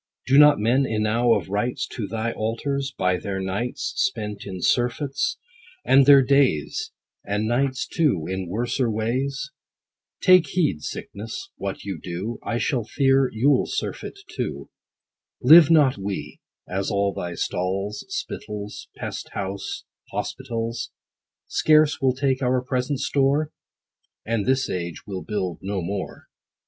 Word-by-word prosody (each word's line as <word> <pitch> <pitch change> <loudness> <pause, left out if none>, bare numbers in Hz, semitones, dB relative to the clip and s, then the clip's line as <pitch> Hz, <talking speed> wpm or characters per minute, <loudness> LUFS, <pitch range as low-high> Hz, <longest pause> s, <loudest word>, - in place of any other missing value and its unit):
Do 135 +2 +5
not 150 -1 +8
men 125 +6 +2
enow 115 +2 +2
of - - -3
rights 120 +6 -1
To 110 -5 -4
thy 115 +2 -2
altars, 135 +6 -2
by 90 0 0
their 95 +1 -4
nights 95 +6 -3
Spent 105 - -2
in 95 -2 -6
surfeits; 130 - 0 0.5
and 135 0 +5
their 140 -2 +9
days, 130 - +2 0.3
And 105 +2 -1
nights 130 +2 0
too, 135 - +1
in 95 0 -3
worser 120 +4 0
ways? 130 +6 -2 0.7
Take 185 -3 +6
heed, 150 - 0
Sickness, 115 - -6
what 100 - -5
you 95 -5 -5
do, 95 +6 -5
I 115 - -2
shall 120 0 0
fear 135 +2 +2
you'll 130 +5 +2
surfeit 420 -1 -4
too. - - -5 0.7
Live 155 +4 +8
not 145 -8 +4
we, 95 -6 -5 0.3
as 95 +1 -2
all 100 -2 +1
thy 85 -1 -5
stalls, 95 +5 -2
Spittles, 105 0 -6
pest - - -5
house, 100 0 -4 0.3
hospitals, 115 0 -3 0.6
Scarce 155 -1 +3
will 130 -1 +2
take 130 0 0
our 125 0 +1
present 130 +2 -1
store? 145 +2 +1 0.7
And 115 -2 -1
this 130 0 +2
age 85 -2 -4
will 95 -3 -5
build 95 -6 -3
no 100 0 -2
more. 95 +3 -5
115 Hz, 135 wpm, -24 LUFS, 100-135 Hz, 0.7 s, their